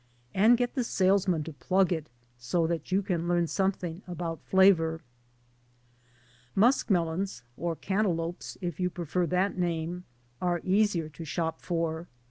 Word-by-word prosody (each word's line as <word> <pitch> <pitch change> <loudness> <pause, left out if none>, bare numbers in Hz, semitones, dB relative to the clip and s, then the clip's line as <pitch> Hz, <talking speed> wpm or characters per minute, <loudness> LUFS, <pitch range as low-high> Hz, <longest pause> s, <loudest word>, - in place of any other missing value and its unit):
And 225 +5 +5
get 245 0 -1
the 255 - 0
salesman' 190 -6 +2
to 160 +1 -7
plug 185 +8 +2
it 160 -2 -4 0.3
so 125 +8 0
that 165 -1 -3
you 195 +2 +2
can 175 -3 -1
learn 175 -1 +2
something 185 -1 -1
about 170 -2 -4
flavor. 165 -4 +4 1.6
skmelons 190 - +2
or 170 +3 -2
cantaloupes, 175 -3 -2
if 175 -3 -4
you 180 0 +1
prefer 175 0 -1
that 185 +2 0
name 175 +1 -2 0.4
are 175 -1 +1
easier 190 -4 +2
to 160 +2 -9
shop 160 +1 -2
for. 165 -1 -2
175 Hz, 135 wpm, -29 LUFS, 165-190 Hz, 1.6 s, And